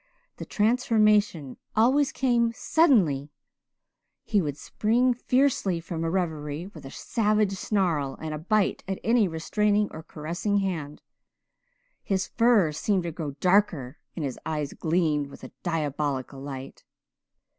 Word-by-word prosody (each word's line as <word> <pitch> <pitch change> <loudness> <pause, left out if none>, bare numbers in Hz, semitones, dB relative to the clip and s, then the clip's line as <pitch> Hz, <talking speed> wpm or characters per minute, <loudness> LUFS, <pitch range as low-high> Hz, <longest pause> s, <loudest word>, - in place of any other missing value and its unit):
The - - -7
transformation 210 - +2 0.2
always 260 +6 +3
came 235 -3 +1
suddenly. 190 - +3 0.9
He 205 -3 +1
would 145 -4 -3
spring 240 +8 +1
fiercely 250 -7 +1
from 165 0 -5
a 165 - 0
reverie 160 -3 -2
with 165 -7 -12
a - - -8
savage 210 - 0
snarl 175 -9 0
and 155 +1 -6
bite 215 -3 +2
at 195 -1 -2
any 230 -3 +3
restraining 205 +5 +1
or 160 - -8
caressing 170 +7 -3
hand. 165 -7 -3 1.0
His 190 -1 -1
fur 230 -9 +3
seemed 185 +5 0
to 170 - -3
grow 155 -3 -5
darker 180 -9 +2 0.2
and 160 - -3
his 130 - -5
eyes 150 -3 -3
gleamed 155 -3 0
with 140 - -14
a - - -9
diabolical 145 -5 -2
light. 135 -1 -8
180 Hz, 130 wpm, -26 LUFS, 150-215 Hz, 1.0 s, always